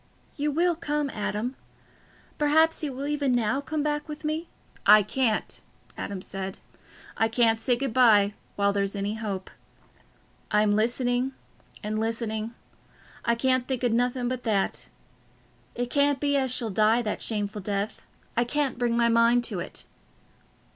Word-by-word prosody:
You 295 +1 0
will 340 +4 +2
come, 295 -3 -2
Adam? 215 +4 -3 0.8
Perhaps 315 +2 +3
you 295 - -1
will 265 +2 -5
even 285 -3 0
now 245 +3 +1
come 305 +1 -2
back 295 0 -1
with 300 +1 -7
me." 310 +2 -2 0.4
"I 215 0 +8
can't," 220 +1 -1 0.3
Adam 190 -2 -5
said. 195 0 -6 0.6
"I 225 - +3
can't 225 -1 +2
say 250 - +3
good 255 -1 -2
bye 210 -5 +5 0.2
while 200 0 +2
there's 200 0 -1
any 200 +1 -2
hope. 205 -4 -5 1.0
I'm 210 0 +3
listening, 245 +4 +1 0.5
and 215 +1 -2
listening—I 225 +1 -4
can't 255 +1 +1
think 260 -2 -2
o' 245 - +3
nothing 245 +2 +1
but 255 0 -2
that. 210 -5 -1 0.9
It 245 0 -3
can't 285 -1 +3
be 285 -1 +1
as 265 -2 +1
she'll 240 -3 -1
die 220 +4 +3
that 210 - -3
shameful 210 -1 -2
death—I 205 +4 -3
can't 270 +1 -1
bring 240 -1 +1
my 235 0 +4
mind 235 +1 +4
to - - -3
it." - - -7
240 Hz, 145 wpm, -26 LUFS, 215-275 Hz, 1.0 s, I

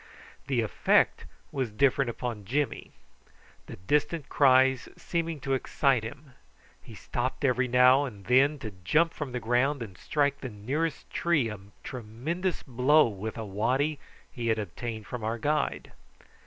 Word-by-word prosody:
The 130 -4 +1
effect 110 - +2 0.3
was 130 -4 -2
different 130 +3 +2
upon 120 -3 -4
Jimmy, 130 +5 -2 0.8
the - - -8
distant 145 - -1
cries 130 -2 +4
seeming 165 -2 -3
to 135 - -1
excite 135 -1 +1
him. 140 +5 -9 0.5
He - - -12
stopped 130 +4 -3
every 130 0 +2
now 125 +3 +5
and 105 -7 -9
then 135 +4 +4
to 110 - -4
jump 160 - +3
from 145 -4 -5
the 125 - -3
ground 125 +3 +1
and 100 -5 -10
strike 140 +6 0
the 130 - -5
nearest 135 +9 -3
tree 155 -9 +1
a 105 -2 -7 0.2
tremendous 135 - -4
blow 135 +4 +4
with 110 +2 -6
a 110 - -4
waddy 130 +9 0 0.3
he 120 -1 -4
had 110 -1 +2
obtained 110 +2 -5
from 120 0 -6
our 110 +2 -1
guide. 150 +6 -1
130 Hz, 150 wpm, -28 LUFS, 115-145 Hz, 0.8 s, now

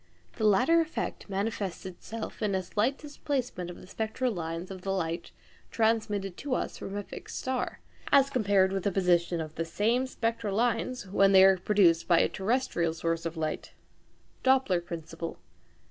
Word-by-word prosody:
The 220 - 0
latter 255 +12 +5
effect 320 -8 -4
manifests 195 -2 -3
itself 215 +4 -7
in 205 -3 +1
a 190 - 0
slight 220 +9 0
displacement 265 - -3
of 175 - -9
the - - -12
spectral 220 +5 -2
lines 170 +1 -4
of 190 -1 -7
the 195 - -5
light 170 -3 -2 0.4
transmitted 215 -4 0
to 275 -2 -2
us - - -3
from 200 - -5
a 205 - -3
fixed - - -8
star, 260 -1 -3 0.3
as 275 -1 +5
compared 200 -6 +3
with 195 0 -1
the 200 - +1
position 175 -2 +2
of 155 -1 -5
the 165 - -2
same 230 +9 +1
spectral 230 -5 -2
lines 235 0 0
when 195 +1 +4
they 190 0 +9
are 190 0 +7
produced 180 -4 +3
by 170 - +5
a - - +4
terrestrial 190 -6 0
source 165 0 -1
of 165 0 -7
light 155 -1 -3 0.7
(Doppler 260 -9 +3
principle). 165 -1 -6
195 Hz, 170 wpm, -29 LUFS, 175-230 Hz, 0.7 s, they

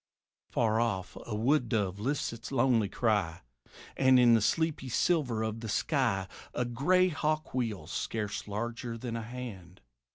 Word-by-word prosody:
Far 110 -1 +1
off 95 -6 -1
a 110 - -3
wood 125 +3 +2
dove 100 -4 0
lifts 130 +3 -1
its 115 +2 -8
lonely 120 -5 +3
cry; 100 -8 0 0.5
And 130 -1 +5
in 120 -1 +6
the 115 - +5
sleepy 155 +2 0
silver 125 -5 +1
of 110 0 -3
the 110 -1 -6
sky 115 - +1 0.3
A 125 - 0
gray 180 +10 +3
hawk 155 -1 -1
wheels 115 -6 -2
scarce 110 -1 -3
larger 115 +3 -4
than 115 0 -5
a 115 - -3
hand. 110 -7 -8
115 Hz, 155 wpm, -30 LUFS, 110-130 Hz, 0.5 s, in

